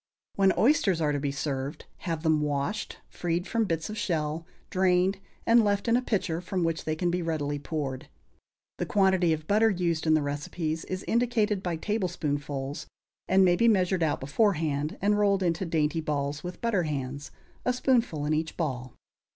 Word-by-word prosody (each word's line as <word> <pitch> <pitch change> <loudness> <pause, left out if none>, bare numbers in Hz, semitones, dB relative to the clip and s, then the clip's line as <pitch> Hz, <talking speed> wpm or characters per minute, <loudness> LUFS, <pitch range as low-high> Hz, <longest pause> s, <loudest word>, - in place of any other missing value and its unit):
When 195 -1 +4
oysters 220 - +3
are 150 -2 +1
to 145 - -1
be 140 0 -1
served, 140 0 -4 0.2
have 165 -2 -2
them 160 -2 +3
washed, 145 +7 -2
freed 175 +1 -2
from 230 0 0
bits 165 -4 -2
of 215 +1 -5
shell, 160 -1 -2 0.2
drained, 185 +1 +2 0.3
and 230 0 +6
left 205 0 +1
in 230 - +4
a 250 - +3
pitcher 185 -8 -1
from 180 0 -2
which 165 -1 -1
they 155 - 0
can 175 +2 0
be 180 +1 -1
readily 145 -3 -2
poured. 140 -3 -4 0.7
The - - -1
quantity 190 -4 +3
of 155 -1 -1
butter 215 +4 +4
used 170 -5 -1
in 155 - +5
the 155 - +2
recipes 155 +3 -3
is 185 0 -4
indicated 225 -4 +1
by 175 -3 -2
tablespoonfuls, 145 -8 -3 0.4
and 190 0 +5
may 175 -1 +4
be 235 +6 +3
measured 185 -4 +3
out 155 -2 +1
beforehand 150 - 0
and 205 +1 +3
rolled 200 -2 +3
into 170 +1 0
dainty 160 0 +1
balls 145 -1 -2
with 180 0 -7
butter 230 -5 +1
hands, 140 -3 -4 0.3
a 250 - +2
spoonful 245 - +1
in 150 - +1
each 155 +1 -2
ball. 130 -6 -3
165 Hz, 180 wpm, -28 LUFS, 150-195 Hz, 0.7 s, and